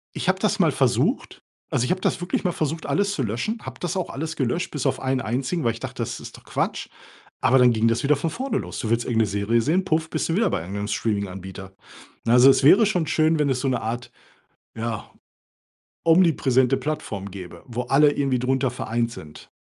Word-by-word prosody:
Ich - - -4
habe - - +2
das - - 0
mal - - +4
versucht. - - 0 0.3
Also, 120 - +1
ich - - -1
habe 185 - 0
das - - 0
wirklich 175 - -2
mal 180 - +1
versucht, 160 0 -3
alles 200 0 +1
zu 135 - -1
löschen. 120 - -2
Habe - - -8
das 175 +2 -3
auch 185 - -2
alles 160 +3 -4
gelöscht 145 +7 -1
bis 145 -4 -4
auf - - +1
einen 130 -1 -1
einzigen, 130 +8 -2
weil 115 - +2
ich 115 - -10
dachte, - - -4
das - - -5
ist - - -10
doch - - -18
Quatsch. - - -2 0.5
Aber 130 - +4
dann 125 -2 +5
ging 110 +1 +2
das 115 +4 +1
wieder 145 +2 +4
von 160 +4 -2
vorne 245 - -2
los. - - -6
Du 110 - -3
willst 115 0 +1
irgendeine 115 -3 +1
Serie 100 +4 +1
sehen. 175 +9 +1
Puff. 160 -2 0
Bist - - -2
du 165 - +1
wieder 215 -2 +2
bei 90 - -1
irgendeinem 100 +4 -5
Streaminganbieter. 95 -3 -4 0.5
Ne, 115 - +3
also, 125 +2 +8
es - - +1
wäre 195 +10 +7
schon 180 -7 0
schön, 155 0 +2
wenn 145 -2 +2
es 130 -1 0
so 135 - -1
'ne 125 -2 0
Art, 120 +2 -4 0.6
ja, 115 -1 -4 1.0
omnipräsente 135 -7 +4
Plattform 100 -10 -4
gäbe, 90 -2 -9
wo 125 0 -3
alle 145 +3 +4
irgendwie 135 -3 0
drunter 130 +1 0
vereint 115 -1 -2
sind. 75 -7 -12
130 Hz, 220 wpm, -23 LUFS, 115-160 Hz, 1.0 s, also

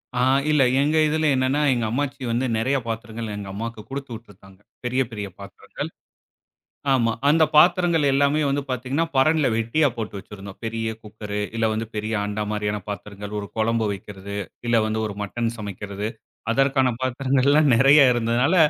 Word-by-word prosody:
ஆ. - - 0 0.3
இல்ல 150 -2 +4 0.2
எங்க 150 +2 +2
இதில 155 +1 0
என்னன்னா, 130 +3 +1
எங்க 120 -2 -1
அம்மாச்சி 140 +2 -2
வந்து 120 +3 0
நெறையா 130 +5 +1
பாத்திரங்கள் 115 -1 -5
எங்க 100 - -6
அம்மாவுக்கு 115 +1 -5
குடுத்துவிட்டுருந்தாங்க. 115 -8 -9 0.3
பெரிய, 125 +2 +1
பெரிய 105 -2 -5
பாத்திரங்கள். 100 -1 -7 1.0
ஆமா. 115 -3 +2 0.2
அந்த 160 +2 +5
பாத்திரங்கள் 175 -1 +5
எல்லாமே 140 +2 +3
வந்து 140 +1 0
பார்த்தீங்கன்னா 130 +6 -1
பரண்ல 155 +2 +4
வெட்டியா 120 +7 +2
போட்டு 105 -3 -5
வச்சிருந்தோம். 100 0 -10
பெரிய 115 0 -2
குக்கரு, 105 -1 -6 0.2
இல்ல 115 - +2
வந்து 110 +1 -2
பெரிய 110 +1 -2
அண்டா 105 +1 -2
மாரியான 105 0 -2
பாத்திரங்கள். 105 0 -6
ஒரு 100 - -6
குழம்பு 115 0 +1
வைக்கிறது, 100 0 -8 0.3
இல்ல 115 - +4
வந்து 110 0 -1
ஒரு 100 - -5
மட்டன் 115 +3 -2
சமைக்கிறது. 100 0 -5 0.4
அதற்கான 135 0 +3
பாத்திரங்கள் 130 +1 +1
எல்லாம் 150 -1 +5
நெறைய 135 +5 +6
இருந்ததனால 120 +8 +2
115 Hz, 150 wpm, -23 LUFS, 105-140 Hz, 1.0 s, நெறைய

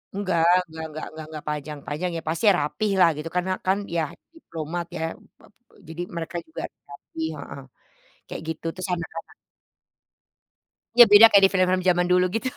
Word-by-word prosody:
Enggak 185 -5 0 0.2
enggak 160 0 -8
enggak 155 +1 -6
enggak 155 0 -9
enggak 155 -1 -9
panjang-panjang, 150 +3 -4
iya 165 - -5
pasti 170 +7 -1
rapilah 180 +6 +2
gitu 160 +2 -5
karena 180 +1 0 0.2
kan 190 +1 +3 0.2
ya 165 - +2 0.3
diplomat 170 - -6
ya, - - -5
mmm, - - -21 0.2
apa, - - -20 0.2
eee, - - -22
jadi 165 +2 -6
mereka 170 +1 -5
juga 160 - -7 0.3
rapih 160 +3 -7
heeh, 140 - -9 0.7
kayak - - -7
gitu, 160 +1 -6
terus 185 +1 -6
anak-anak 165 -1 -8 1.6
Iya 240 -1 +10
beda 205 +2 +9
kayak 200 -1 +6
di - - -10
film-film 185 -1 +2
zaman 175 0 +3
dulu 180 0 +4
gitu. 255 +3 -1
170 Hz, 165 wpm, -24 LUFS, 160-185 Hz, 1.6 s, Iya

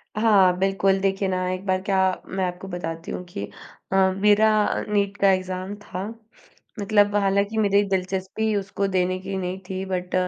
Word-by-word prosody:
हाँ, 200 -4 +4
बिल्कुल, 195 0 +2
देखिए 195 0 0
ना, 185 -1 -1
एक 185 +1 -5
बार 185 -1 +1
क्या 195 0 0 0.3
मैं 190 0 -2
आपको 180 +2 -6
बताती 165 -2 -5
हूँ 180 - -5
कि 100 - -4 0.5
अ, - - +3 0.2
मेरा 210 +1 +5 0.4
नीट 200 -1 0
का 195 -1 +5
एग्ज़ाम 185 +1 -3
था। 190 -1 -5 0.8
मतलब 205 0 +3
हालाँकि 200 +2 +1
मेरी 200 -1 +3
दिलचस्पी 190 +3 -1
उसको 200 0 -2
देने 185 -1 0
की 195 +1 -5
नहीं 185 0 -3
थी, 190 0 -3
बट 180 -1 -4
190 Hz, 165 wpm, -24 LUFS, 185-200 Hz, 0.8 s, मेरा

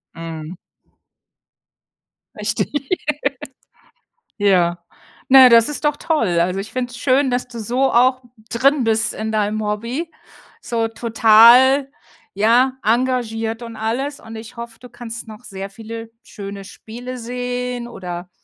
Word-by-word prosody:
Mhm. 165 0 -7 1.8
Richtig. 290 +4 -2 1.3
Ja. 175 -4 +2 0.5
Naja, 260 -1 +9
das 230 +1 +6
ist 295 0 -4
doch 295 -1 +1
toll. 225 - 0
Also 180 +3 0
ich 205 - -7
finde 250 -1 -3
es 240 - -10
schön, 265 0 +2
dass 245 0 -1
du 235 -1 -9
so 250 +5 0
auch 255 +2 +3 0.3
drin 270 +3 +2
bist 220 0 +1
in 220 0 -4
deinem 215 0 -1
Hobby, 230 +10 -3 0.5
so 230 -1 -1
total, 235 +4 +5 0.4
ja, 235 +6 +3
engagiert 230 -1 0
und 230 -1 -8
alles. 255 +6 -3
Und 225 0 -11
ich 220 +2 -10
hoffe, 235 -1 -8
du 250 - -13
kannst 230 -1 -8
noch 215 +2 -12
sehr 195 -3 -7
viele 225 +2 -9
schöne 200 -4 -8
Spiele 245 +5 -9
sehen 245 0 -4
oder, 180 -4 -7
230 Hz, 130 wpm, -19 LUFS, 215-250 Hz, 1.8 s, Naja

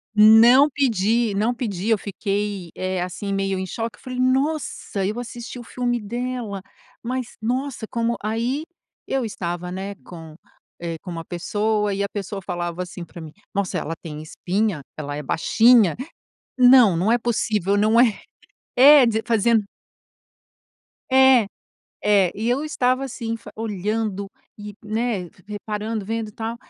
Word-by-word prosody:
Não 230 +6 +7
pedi, 230 -4 +1
não 220 +5 +1
pedi. 215 -5 -3
Eu 225 - +4
fiquei, 200 -2 -3
eh, 185 -1 -2
assim 185 +3 -4
meio 195 -1 -1
em 190 - -3
choque. 225 +4 -5
Eu - - -22
falei: 255 -2 -6
"Nossa, 260 -6 0
eu 215 +5 -2
assisti 240 0 -7
o - - -8
filme 245 0 -2
dela, 235 -2 -4 0.4
mas 255 0 -4
nossa 250 +1 -2
Como?". 235 +1 -1
Aí 235 +7 -1 0.4
eu 270 -1 0
estava, 180 -4 -4
né, 195 +2 -5
com, 165 -3 -11 0.5
eh, 165 -1 -4
com 180 - -8
uma 165 -1 -5
pessoa, 210 +4 -1
e 200 +1 -1
a 200 - -2
pessoa 200 -1 -5
falava 175 0 -4
assim 175 0 -8
para 170 - -11
mim: 160 -1 -9 0.2
"Nossa, 200 -2 -1
ela 165 - -3
tem 150 -2 -7
espinha, 185 +2 -2 0.2
ela 145 -1 -5
é 150 - -4
baixinha. 220 - +4 0.6
Não, 250 -7 +7
não 190 +7 +2
é 240 - +3
possível, 215 -4 0
não 215 +3 +3
é". 230 -5 +3 0.6
É, 275 +1 +8
dize 225 -1 0
fazendo 230 -1 +3 1.5
É, 265 -4 +6 0.6
é. 200 -4 +4
E 220 +3 -2
eu 260 +5 +1
estava 255 -3 0
assim 230 -3 -4
fa - - -12
olhando 210 -1 -2 0.3
e, 205 0 -8
né, 215 -4 -2 0.2
reparando, 210 +1 -4
vendo 225 +1 -3
e - - -12
tal. 225 +2 -4
215 Hz, 155 wpm, -22 LUFS, 195-240 Hz, 1.5 s, É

